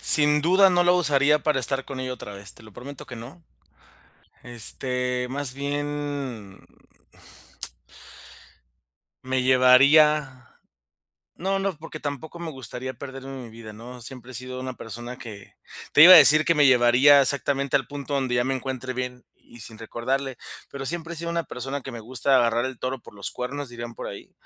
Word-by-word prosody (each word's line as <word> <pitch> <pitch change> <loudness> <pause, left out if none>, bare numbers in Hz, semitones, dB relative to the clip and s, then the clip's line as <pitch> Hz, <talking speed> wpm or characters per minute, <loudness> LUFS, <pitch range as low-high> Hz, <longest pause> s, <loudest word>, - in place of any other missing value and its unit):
sin 150 -1 +3
duda 190 +3 +5
no 175 -1 +3
la 175 - +5
usaría 150 -3 +3
para 150 -3 +1
estar 135 +2 -2
con 135 -2 -7
ella 130 0 -3
otra 110 -4 -8
vez, 100 0 -9
te - - -17
lo 110 -1 -15
prometo 135 +5 -10
que 120 - -9
no. 135 +10 -11 1.0
Este, 125 +1 -3
más 135 -1 -3
bien 140 -7 -4 2.7
me 130 0 0
llevaría, 130 +1 +4 0.8
no 195 +2 -2
no, 195 -2 -2
porque 155 0 -10
tampoco 145 +4 -6
me 170 -2 -6
gustaría 130 -1 -7
perderme 135 0 -8
mi 115 - -11
vida, 110 -1 -11
¿no? 120 +3 -11
Siempre 125 +1 -11
he - - -8
sido 130 +1 -6
una 130 0 -6
persona 120 +3 -8
que, 105 -4 -11 0.4
te 150 - +8
iba 185 - +11
a 180 - +12
decir 155 +1 +7
que 170 - +4
me 145 -3 +4
llevaría 130 +3 +6
exactamente 140 0 0
al - - +1
punto 145 0 -6
donde 130 -3 0
ya 120 - +2
me 135 +1 -1
encuentre 130 -1 -4
bien, 125 0 -5
y 120 - -16
sin 110 -1 -9
recordarle, 130 +3 -3 0.3
pero 135 -1 -7
siempre 170 +2 -5
he - - -8
sido 170 +1 -4
una 170 -1 -2
persona 135 +3 -5
que 135 - -8
me 115 - -7
gusta 130 +4 0
"agarrar 120 0 +2
el 130 -1 -5
toro 130 +1 -4
por 105 - -15
los 100 - -6
cuernos", 140 +3 -5
dirían 120 -1 -8
por - - -7
ahí. - - -9
130 Hz, 180 wpm, -24 LUFS, 125-145 Hz, 2.7 s, a